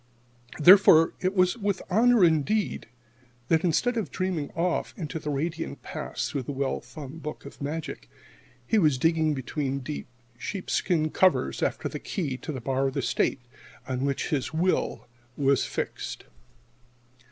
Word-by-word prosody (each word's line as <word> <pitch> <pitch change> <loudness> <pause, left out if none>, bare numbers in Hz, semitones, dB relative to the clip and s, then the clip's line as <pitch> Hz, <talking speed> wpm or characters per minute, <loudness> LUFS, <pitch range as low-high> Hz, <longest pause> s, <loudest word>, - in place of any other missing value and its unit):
Therefore 175 -1 +7
it 185 +2 -1
was 185 -1 +3
with 200 -3 -1
honor 225 +1 +5
indeed 170 +7 +1 0.6
that, 160 0 +3
instead 235 +8 +1
of 205 -10 -2
dreaming 170 0 -2
off 170 +1 -1
into 160 -2 -4
the 150 - -5
radiant 145 - -3
past - - -4
through 140 - -2
the 130 - -5
well 135 -1 -1
thumbed 155 0 -10
book 150 -1 -7
of 140 - -11
magic, 155 +3 -5 0.6
he 220 - +3
was 150 -7 +3
digging 160 +1 +2
between 135 +1 -2
dull 145 +4 -4 0.4
sheepskin 170 - -1
covers 170 - +2
after - - -1
the - - -5
key 150 -9 -3
to 155 - -6
the 135 - -5
bar 135 +2 0
of 135 - -4
the - - -1
State, 135 - 0 0.5
on 130 -1 -2
which 140 -1 -1
his 140 -4 -1
will 165 -5 0 0.3
was 140 -1 +2
fixed. - - -4
155 Hz, 150 wpm, -27 LUFS, 140-185 Hz, 0.6 s, Therefore